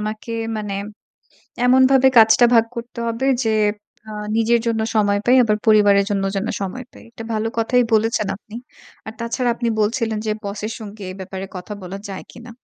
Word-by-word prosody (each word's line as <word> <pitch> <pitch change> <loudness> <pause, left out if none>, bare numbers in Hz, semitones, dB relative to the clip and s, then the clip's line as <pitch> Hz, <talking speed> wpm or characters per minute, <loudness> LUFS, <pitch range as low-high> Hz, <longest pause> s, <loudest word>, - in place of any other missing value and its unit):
আমাকে 215 +2 -5 0.2
মানে 210 -2 -4 0.9
এমনভাবে 260 +1 +5
কাজটা 225 +1 +7
ভাগ 230 -1 +5
করতে 235 +1 -8
হবে 230 +3 -2 0.2
যে 225 - +1 0.6
আ - - -8 0.3
নিজের 230 +1 +3
জন্য 225 -1 0
সময় 205 -2 +2
পাই 250 +2 +5
আবার 215 -2 +1
পরিবারের 205 -2 +5
জন্য 195 -1 0
যেন 195 - -2
সময় 200 +7 -5
পাই। - - -15
এটা 225 -1 -9
ভালো 220 +1 -1
কথাই 245 +2 +3
বলেছেন 220 -1 +1
আপনি। 215 +2 -12 0.5
আর 220 - -6
তাছাড়া 235 +2 -1
আপনি 235 0 -2
বলছিলেন 220 0 0
যে, 215 - +1
বস 200 0 -5
এর 220 - -4
সঙ্গে 210 -2 -10
এ - - -11
ব্যাপারে 190 +1 -6
কথা 185 +3 -8
বলা 185 +2 -7
যায় 195 -1 -6
কিনা? 240 +1 -12
220 Hz, 180 wpm, -20 LUFS, 205-235 Hz, 0.9 s, কাজটা